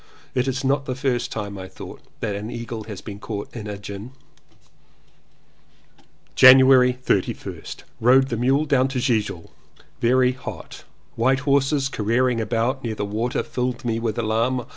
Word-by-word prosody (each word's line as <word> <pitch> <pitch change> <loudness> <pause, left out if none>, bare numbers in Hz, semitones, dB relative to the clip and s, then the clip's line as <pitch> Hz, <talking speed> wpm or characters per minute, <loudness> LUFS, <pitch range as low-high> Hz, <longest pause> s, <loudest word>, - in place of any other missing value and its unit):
It 125 +1 0
is 135 0 -2
not 135 +1 0
the 130 - -2
first 125 -3 -1
time, 100 -2 -5
I 95 - -7
thought, - - -11 0.2
that 105 - -2
an 105 +2 -5
eagle 115 -2 -6
has 105 -4 -8
been 100 -2 -8
caught 105 0 -6
in 110 -3 -6
a 105 -1 -5
gin. 100 +4 -8 2.2
January 130 -1 +7
31st. 95 - -2 0.2
Rode 130 +3 +4
the 120 - -1
mule 135 +6 +2
down 135 -3 +2
to 130 -1 -3
Gilgil. 105 -8 -1 0.5
Very 125 +1 +3
hot. 130 0 -9 0.3
White 130 +4 +1
horses 140 0 +2
careering 120 0 0
about 120 +4 -1
near 115 -2 -3
the 105 - -3
water 110 +4 -2
filled 125 -1 -3
me 115 -1 0
with 115 -1 -2
alarm. 115 +2 0
120 Hz, 155 wpm, -22 LUFS, 110-130 Hz, 2.2 s, January